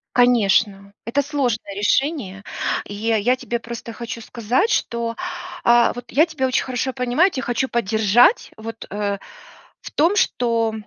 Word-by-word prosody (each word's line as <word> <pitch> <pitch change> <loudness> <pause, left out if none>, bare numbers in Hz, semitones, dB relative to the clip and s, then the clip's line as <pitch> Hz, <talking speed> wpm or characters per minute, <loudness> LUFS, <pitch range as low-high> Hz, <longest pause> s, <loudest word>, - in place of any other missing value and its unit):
Конечно, 205 -5 +3
это 275 +5 +1
сложное 260 -8 -2
решение, 210 - 0 0.4
и 205 - -8
я 225 +3 +1
тебе 240 -2 -4
просто 235 0 -7
хочу 235 0 -6
сказать, 240 - 0
что, 235 - -1 0.5
а 235 0 +5
вот 245 0 -10
я 310 +5 +4
тебя 290 -6 -1
очень 255 - +1
хорошо 260 0 -2
понимаю. 250 +6 +2
Я - - -8
тя 265 - -4
хочу 255 +2 -1
поддержать, 230 - +3
вот, 225 0 -8
э, 205 0 -2 0.6
в - - -9
том, 335 +7 +2
что 230 - +1
235 Hz, 150 wpm, -21 LUFS, 220-260 Hz, 0.6 s, а